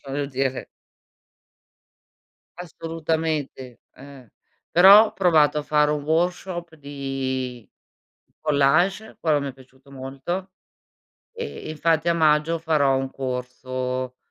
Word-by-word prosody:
Voglio 140 +1 -3
dire. 135 -1 -2 1.9
Assolutamente, 160 -6 -4
eh. 135 -4 -14 0.4
Però 195 +5 +8
ho - - -9
provato 155 -5 +3
a - - -3
fare 150 0 +2
un 150 -1 -2
workshop 175 +1 -1
di 135 -4 -5 0.7
collage, 155 +8 +1
quello 150 -3 +2
mi 140 - -4
è - - -13
piaciuto 130 +1 -20
molto 140 +8 -6 0.8
e 465 0 -7
e - - -6
infatti 160 +2 +1
a - - +3
maggio 155 0 +2
farò 150 -5 +2
un 135 0 -3
corso 130 0 -4
150 Hz, 110 wpm, -23 LUFS, 135-165 Hz, 1.9 s, Però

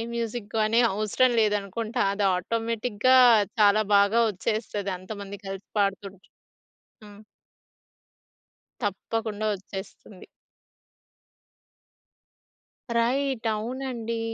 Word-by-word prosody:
మ్యూజిక్‌గాని 225 0 0
అవసరం 215 +5 +2
లేదనుకుంటా. 215 +3 -1
అది 200 0 0
ఆటోమేటిక్‌గా 230 +4 +1 0.4
చాలా 210 +1 +5
బాగా 200 +3 +4
వచ్చేస్తది 205 0 -3
అంతమంది 200 +1 -8
కలిసి 195 0 -7
పాడుతుంటే. 195 0 -2 0.8
హ్మ్. 205 0 -14 1.6
తప్పకుండా 215 +1 -3
వచ్చేస్తుంది. 195 0 -10 2.7
రైట్. 250 0 0
అవునండి. 230 0 -4
215 Hz, 65 wpm, -26 LUFS, 200-230 Hz, 2.7 s, చాలా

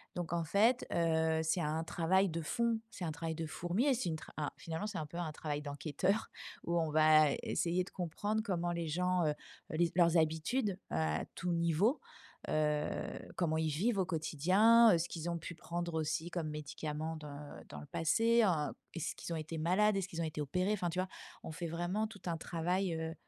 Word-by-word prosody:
donc, 175 -1 -3
en 170 -1 +1
fait, 220 +9 +3
heu, 160 -1 +2
c'est 170 +3 +1
un 155 +2 -1
travail 185 +4 +2
de 165 +1 -3
fond, 230 +7 0
c'est 180 - -6
un 160 - -1
travail 160 +1 -4
de 165 0 -3
fourmi 175 - -1
et 280 - +5
c'est 230 -8 -1
une 160 - -1
tra - - -12
un 150 -2 -1
finalement, 165 +5 -4
c'est 205 - -4
un 155 - -2
peu 170 +3 -9
un 165 -3 -2
travail 150 -1 -3
d'enquêteur 155 +8 -1 0.3
où 170 0 0
on 160 -1 0
va 155 -1 +6
essayer 175 +1 0
de - - -12
comprendre 205 +5 -2
comment 175 -4 -1
les 170 -1 -2
gens, 180 +2 +1
heu - - +3
heu, 150 +1 -8
les 170 -1 +3
leurs 170 -1 +5
habitudes 180 +7 +1
à 80 0 0
tout 180 0 -2
niveau, 170 - +2 0.5
heu, 150 -1 +1 0.5
comment 160 -3 +1
ils 160 -1 +1
vivent 195 +8 +1
au 185 - +2
quotidien, 190 +7 +5
heu, - - +5
ce 165 +1 -1
qu'ils 170 0 -4
ont 170 - -1
pu 170 +1 -7
prendre 170 0 -4
aussi 160 +2 -1
comme 165 -3 -2
médicament 150 +1 -4
dans 145 - -9
dans 75 - -7
le 75 - -10
passé, 230 +8 +3
heu, 160 -7 +2 0.2
est-ce 165 - -3
qu'ils - - -7
ont - - -1
été 155 +1 -5
malades, 195 +6 +3
est-ce 195 -1 -1
qu'ils 170 -3 -4
ont - - 0
été 155 -1 -3
opérés, 180 +8 0
enfin, 180 -4 -1
tu 180 +3 -2
vois, 185 - 0 0.4
on - - -6
fait 170 +2 -4
vraiment 175 +6 -1
tout 200 -4 -13
un 170 -2 -1
travail, 175 +2 -1
heu 160 0 -3
170 Hz, 215 wpm, -34 LUFS, 155-185 Hz, 0.5 s, va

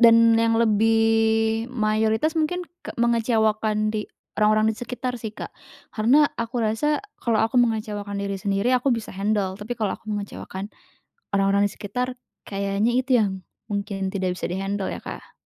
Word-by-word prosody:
dan 230 -1 +8 0.2
yang 230 0 +3
lebih 225 +1 +3
mayoritas 220 +5 +1
mungkin 350 +3 0 0.2
ke - - -8
mengecewakan 220 -2 +1
di 210 -1 -3 0.3
orang-orang 215 +1 +4
di - - -8
sekitar 250 -1 -4
sih, 220 - -4
Kak. - - -7 0.4
Karena 255 +7 +4 0.2
aku 230 0 -1
rasa 295 - 0 0.2
kalau 230 -2 +1
aku 235 +2 +3
mengecewakan 210 -3 -1
diri 200 -1 -3
sendiri 200 +4 +1
aku 255 +2 +2
bisa 230 -2 -2
handle, 200 0 -1
tapi 230 +3 -4
kalau 210 -3 -1
aku 215 - -10
mengecewakan 205 -1 -5 0.6
orang-orang 200 0 +3
di 200 - -4
sekitar 250 +6 -3 0.3
kayaknya 200 +3 0
itu 260 -1 +2
yang, 200 -2 +2 0.4
mungkin 200 -2 -2
tidak 185 -2 -1
bisa - - -6
di-handle 195 +1 -2
ya, - - -6
Kak. - - -9
220 Hz, 155 wpm, -24 LUFS, 205-235 Hz, 0.6 s, dan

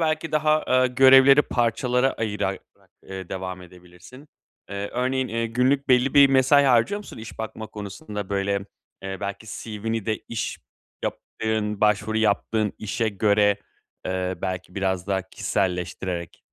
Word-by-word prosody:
belki 160 0 -1
daha, 155 0 +2
ııı, 130 0 +4
görevleri 135 +2 +7
parçalara 125 +2 +1
ayırarak, 105 -3 -2 0.5
ııı, 95 -2 -6
devam 95 -1 -5
edebilirsin. 90 - -15 0.4
Eee, 100 0 -4
örneğin, 130 +1 0
eee, 115 +1 -1
günlük 130 +4 +1
belli 125 +1 +3
bir 140 -1 +8
mesai 135 +2 +5
harcıyor 130 - +3
musun? 205 - -11
İş 110 0 -10
bakma 110 0 -5
konusunda 105 -1 -7
böyle, 100 0 0 0.5
eee, 95 0 -4
belki 100 +2 -5
CV'ni 110 0 -4
de 110 - 0
iş 115 - -3 0.5
yaptığın, 110 -2 -3
başvuru 105 +1 +2
yaptığın 110 0 +1
işe 110 +2 -1
göre, 105 0 +3 0.5
ııı, 95 0 -3
belki 90 -1 -4
biraz 95 -2 -1
daha 95 -1 0
kişiselleştirerek. 90 -1 -3
110 Hz, 135 wpm, -24 LUFS, 95-125 Hz, 0.5 s, bir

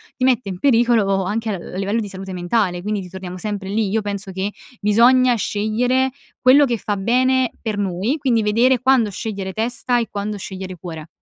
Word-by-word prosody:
ti 255 - -4
mette 250 -4 +2
in 185 -2 -5
pericolo 225 -6 +3
anche 220 +4 -2
al 180 -2 -7
livello 200 +4 0
di 210 - -3
salute 190 0 -8
mentale, 180 0 0
quindi 210 +1 -2
ritorniamo 185 0 -8
sempre 205 -1 -4
lì. 205 +1 0
Io 220 +3 +1
penso 200 -1 -4
che 190 +2 -3 0.3
bisogna 240 +4 +4
scegliere 245 +6 0 0.3
quello 265 +3 +6
che 240 -3 -1
fa 205 -1 -2
bene 255 +5 +2
per 220 -3 -3
noi, 200 - -1
quindi 235 -5 +1
vedere 240 +5 +3
quando 255 -3 +3
scegliere 195 -1 -5
testa 240 +2 0
e 230 - -2
quando 205 +1 -3
scegliere 185 -1 -7
cuore. 160 -2 -8
210 Hz, 180 wpm, -20 LUFS, 195-240 Hz, 0.3 s, quello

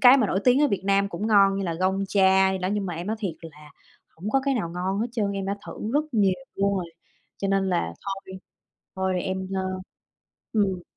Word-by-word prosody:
cái 250 +1 +9
mà 245 -6 +3
nổi 190 0 0
tiếng 255 +3 +5
ở 290 - +4
Việt 200 - -1
Nam 200 0 +3
cũng 200 +4 -4
ngon 195 -2 +5
như 195 - -2
là 170 -2 -2
Gong 190 +3 0
Cha 190 -1 +4
gì 190 - -2
đó. 185 0 -1
Nhưng 205 -2 -1
mà 175 - -3
em 170 +3 -5
nói 220 - -1
thiệt 185 -6 -2
là 150 -2 -12 0.5
hổng 195 +6 -4
có 270 - +3
cái 275 - +2
nào 185 -9 -2
ngon 185 +3 -2
hết 230 - +1
trơn, 205 -5 0
em 195 -1 -3
đã 200 +1 -1
thử - - -6 0.2
rất 300 - +3
nhiều 200 -4 +3 0.2
luôn 200 0 +1
rồi. 180 -2 -2 0.5
Cho 195 - -2
nên 195 -1 +2
là 85 - 0
thôi, 195 -1 -6 0.6
thôi 190 -1 0
em, 190 0 -3
ơ 190 - 0 0.9
ừm. 195 -5 +1
195 Hz, 235 wpm, -25 LUFS, 185-205 Hz, 0.9 s, cái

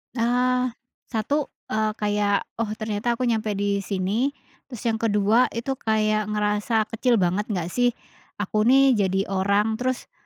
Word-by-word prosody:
Eee, 250 +1 +2 0.4
satu, 275 +6 -1 0.2
eee, 215 0 +1
kayak 205 -1 +1 0.2
oh 230 - 0
ternyata 215 +2 -2
aku 255 - -3
nyampe 220 -3 0
di 200 0 0
sini, 200 +7 -1 0.4
terus 245 -5 -9
yang 225 -1 0
kedua 215 +2 +3
itu 235 +4 -2
kayak 215 -1 +1
ngerasa 210 +1 +1
kecil 240 +2 +2
banget 190 +1 +1
nggak 180 -5 -3
sih, 245 -1 +1 0.4
aku 215 +2 0
nih 270 +1 +6
jadi 190 -1 +1
orang 200 +3 +1
terus, 255 0 -2
215 Hz, 145 wpm, -24 LUFS, 205-240 Hz, 0.4 s, nih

